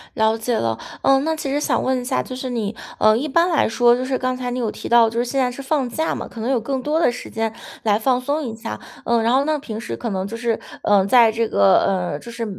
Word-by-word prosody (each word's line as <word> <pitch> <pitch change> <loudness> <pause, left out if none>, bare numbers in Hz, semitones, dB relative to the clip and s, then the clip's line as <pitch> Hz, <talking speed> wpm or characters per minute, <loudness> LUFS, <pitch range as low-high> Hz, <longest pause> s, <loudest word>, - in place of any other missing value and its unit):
了 220 -1 +2
解 230 +2 -1
了。 115 -1 -1 0.2
呃， 270 0 +4
那 320 +2 0
其 295 -3 -4
实 285 +2 0
想 - - 0
问 260 -1 0
一 - - -8
下， 260 +1 0
就 255 - -7
是 255 0 -5
你， 225 -3 -3 0.2
呃， 215 0 +5
一 280 +6 -2
般 335 +5 +2
来 330 - +2
说 240 +1 +4
就 255 +1 -3
是 260 0 -1
刚 255 0 -1
才 250 -1 -4
你 250 - -3
有 230 -3 -1
提 - - -8
到， 235 -1 +6
就 230 +1 -3
是 240 - +1
现 270 +3 -2
在 250 -1 +1
是 245 - -8
放 270 -2 -1
假 320 +7 -1
嘛， - - -5
可 230 - -9
能 235 - -2
有 265 -3 +2
更 260 +3 -3
多 300 +4 0
的 325 - +3
时 240 - -8
间 225 -1 -2 0.3
来 210 -2 +3
放 250 +3 +1
松 290 +4 -1
一 230 -4 -5
下。 110 - -6 0.3
呃， 235 -1 +2
然 230 +2 +2
后 270 +2 +3
呢， 310 0 +1
平 220 -6 -6
时 235 - -5
可 235 - -4
能 190 -1 -2
就 225 - -6
是， 230 -1 -1 0.2
呃， 200 -2 +4
在 230 +1 +5
这 225 +1 0
个， 100 - +4
呃， 180 -6 -1
就 235 - -10
是 235 0 -4
240 Hz, 310 characters per minute, -21 LUFS, 225-265 Hz, 0.3 s, 到